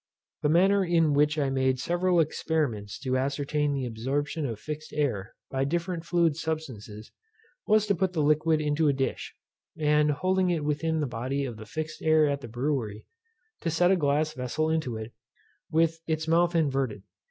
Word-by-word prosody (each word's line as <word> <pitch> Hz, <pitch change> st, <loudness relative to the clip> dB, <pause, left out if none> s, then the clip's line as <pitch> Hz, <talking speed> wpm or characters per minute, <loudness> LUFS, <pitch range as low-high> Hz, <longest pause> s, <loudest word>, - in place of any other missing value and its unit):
The 150 Hz, -, +2 dB
manner 195 Hz, +5 st, +4 dB
in 165 Hz, -4 st, +3 dB
which 150 Hz, +2 st, +3 dB
I 140 Hz, -3 st, +1 dB
made 130 Hz, -1 st, +1 dB
several 175 Hz, +4 st, +1 dB
experiments 140 Hz, -10 st, -1 dB
to 130 Hz, -2 st, -1 dB
ascertain 145 Hz, +2 st, 0 dB
the 135 Hz, -2 st, -1 dB
absorption 140 Hz, +6 st, -2 dB
of 115 Hz, -4 st, -5 dB
fixed 155 Hz, +3 st, -6 dB
air 120 Hz, -10 st, -1 dB, 0.2 s
by 135 Hz, 0 st, 0 dB
different 170 Hz, +3 st, -2 dB
fluid 170 Hz, -3 st, +2 dB
substances, 130 Hz, -10 st, -5 dB, 0.6 s
was 215 Hz, 0 st, +4 dB
to 205 Hz, -, +2 dB
put 185 Hz, 0 st, 0 dB
the 155 Hz, -3 st, +1 dB
liquid 155 Hz, +1 st, +3 dB
into 150 Hz, +1 st, +1 dB
a 145 Hz, -, +4 dB
dish, 135 Hz, 0 st, -3 dB, 0.4 s
and 150 Hz, -1 st, +3 dB
holding 185 Hz, +5 st, +1 dB
it 165 Hz, -4 st, 0 dB
within 155 Hz, +2 st, 0 dB
the -, -, +1 dB
body 130 Hz, +3 st, -2 dB
of 120 Hz, -4 st, -6 dB
the 110 Hz, 0 st, -10 dB
fixed 155 Hz, +6 st, -5 dB
air 155 Hz, -1 st, +4 dB
at 140 Hz, -1 st, -1 dB
the 120 Hz, -, -7 dB
brewery, 120 Hz, -3 st, -2 dB, 0.5 s
to 165 Hz, -, -2 dB
set 175 Hz, +3 st, +3 dB
a -, -, +5 dB
glass 150 Hz, -1 st, +1 dB
vessel 140 Hz, +5 st, -1 dB
into 155 Hz, -8 st, -1 dB
it, 110 Hz, +1 st, -7 dB, 0.6 s
with 165 Hz, 0 st, +1 dB
its 160 Hz, 0 st, -1 dB
mouth 170 Hz, +2 st, +3 dB
inverted. 135 Hz, -, 0 dB
150 Hz, 175 wpm, -27 LUFS, 135-165 Hz, 0.6 s, a